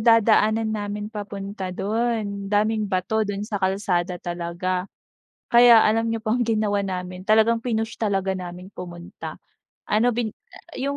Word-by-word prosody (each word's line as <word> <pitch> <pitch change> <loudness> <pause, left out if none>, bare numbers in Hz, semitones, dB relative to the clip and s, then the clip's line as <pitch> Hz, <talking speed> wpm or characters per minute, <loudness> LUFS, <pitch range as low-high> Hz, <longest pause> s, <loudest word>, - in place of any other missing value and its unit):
dadaanan 220 -1 +4
namin 210 0 -4
papunta 200 -2 -5
do'n, 205 0 -2
daming 210 +1 +1
bato 190 +3 0
do'n 205 -1 -2
sa 210 -2 -4
kalsada 190 -2 0
talaga. 175 +2 -3 0.6
Kaya 235 -1 +8
alam 225 +2 +2
niyo 225 - -3
pong 235 +2 +1
ginawa 210 -3 +1
namin, 180 0 -5
talagang 220 +2 +4
pinush 225 -1 -2
talaga 195 -3 0
namin 180 0 -8
pumunta. 175 0 -8 0.5
Ano 220 +3 +2
bin 230 -3 -1 0.5
yung 280 +1 -1
205 Hz, 130 wpm, -24 LUFS, 190-220 Hz, 0.6 s, Kaya